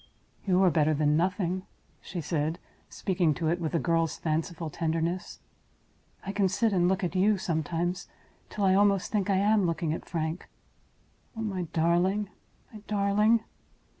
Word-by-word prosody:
"You 185 0 +4
are 185 - +5
better 155 0 +2
than 150 0 +2
nothing," 185 +2 0 0.4
she 175 - -5
said, 155 +1 -1 0.3
speaking 175 -5 0
to 160 -2 -1
it 175 +2 0
with 160 0 -2
a - - +3
girl's 165 -2 0
fanciful 160 0 -2
tenderness. 165 +2 -2 0.9
"I 195 - -2
can 200 -1 +1
sit 220 +3 +1
and 175 -2 +3
look 190 +2 0
at 175 - -1
you 200 +3 +3
sometimes, 175 0 -2 0.4
till 205 - -3
I 190 - +4
almost 200 -1 +3
think 205 -2 0
I 195 - +3
am 205 -1 +3
looking 165 -1 -1
at - - -6
Frank. 160 +1 -3 0.9
Oh, - - -3
my 190 -5 -3
darling! 180 +5 +1 0.4
my 215 - -9
darling!" 210 +2 +2
180 Hz, 160 wpm, -28 LUFS, 165-195 Hz, 0.9 s, are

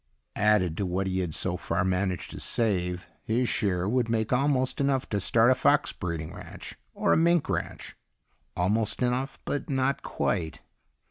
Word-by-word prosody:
Added 100 -6 +2
to 100 - -1
what 95 +2 -1
he 95 0 -1
had 85 -4 -2
so - - -1
far 90 - -1
managed 95 -1 -1
to - - -7
save, 90 -6 -1
his 120 +3 0
share 95 -5 0
would 120 +1 +1
make 110 0 0
almost 130 0 +1
enough 135 -2 +1
to 100 - 0
start 115 +5 +4
a - - +7
fox 130 - +2
breeding 85 -3 -4
ranch. - - -9 0.2
Or - - +2
a - - +4
mink 170 0 +3
ranch. - - -4 0.6
Almost 105 +7 +1
enough 125 +3 -1
but 145 - -3
not 135 0 0
quite. 80 -3 -2
105 Hz, 170 wpm, -27 LUFS, 90-130 Hz, 0.6 s, a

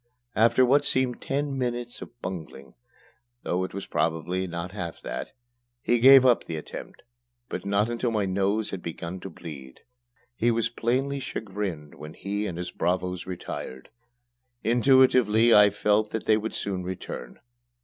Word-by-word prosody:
After 115 +3 +5
what 140 +3 +4
seemed 130 -3 0
ten 140 0 -2
minutes 120 -1 -3
of 120 - -11
bungling, 80 -7 -7 0.7
though 90 +1 0
it 95 - -4
was 100 0 -6
probably 85 +3 -1
not 85 +1 -5
half 90 -5 -6
that, - - -5 0.5
he 120 0 +1
gave 135 +2 +9
up 125 -2 +4
the 80 - -4
attempt, 75 - -8 0.5
but 90 +2 -5
not 100 +2 +2
until 120 +1 -1
my 105 -3 0
nose 100 +3 0
had 95 - -5
begun 85 +2 -6
to 95 - -7
bleed. 70 -8 -10 0.5
He 120 0 +2
was 115 0 +1
plainly 130 +4 -1
chagrined 95 - -5
when 75 +1 -10
he 105 +2 -3
and 85 - -5
his 90 0 -4
bravos 90 0 -1
retired. 75 -7 -6 0.7
Intuitively 120 -2 +5
I 105 0 +8
felt 105 +1 +1
that 110 - -4
they 110 - +5
would 110 +1 -3
soon 95 -2 -2
return. 90 -9 -7
105 Hz, 155 wpm, -26 LUFS, 90-120 Hz, 0.7 s, gave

